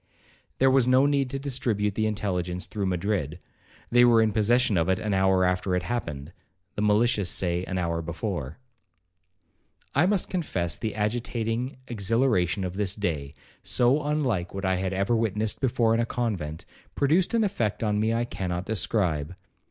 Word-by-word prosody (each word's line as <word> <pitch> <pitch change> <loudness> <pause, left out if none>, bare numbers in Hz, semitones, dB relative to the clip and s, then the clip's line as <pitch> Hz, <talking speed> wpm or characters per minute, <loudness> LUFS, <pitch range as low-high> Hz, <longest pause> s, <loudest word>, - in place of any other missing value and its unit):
There 135 0 +4
was 130 -2 +4
no 130 +2 +5
need 140 -2 +1
to 135 - -3
distribute 120 -7 -1
the 110 +1 0
intelligence 90 -4 -2
through 100 -3 -3
Madrid,—they 90 - -1
were 120 -2 +6
in 110 -1 +3
possession 110 +1 +2
of 85 +1 +1
it 95 - +2
an 105 0 -2
hour 95 -1 +3
after 90 0 0
it 90 - -1
happened,—the 90 -1 -6
malicious 105 -1 +2
say 90 -1 0
an 95 - -3
hour 85 -2 -1
before. 85 -3 -4 1.4
'I 160 +6 +3
must 200 -2 +1
confess 95 - -2
the 110 -3 -3
agitating 115 +3 -2
exhilaration 100 - +1
of 90 +1 -4
this 100 -2 -1
day, 75 -9 -3 0.3
so 125 +5 +2
unlike 135 -13 -1
what 95 0 -3
I 95 0 +1
had 95 0 -2
ever 100 +5 +1
witnessed 110 -1 -1
before 115 -3 +2
in 115 - +2
a 115 - +2
convent, 95 -12 -3 0.3
produced 165 +9 +2
an 225 - +3
effect 115 - -1
on 105 -1 +1
me 110 +1 +1
I 115 +1 0
cannot 90 -5 -4
describe. 95 -7 -1
105 Hz, 160 wpm, -26 LUFS, 90-120 Hz, 1.4 s, were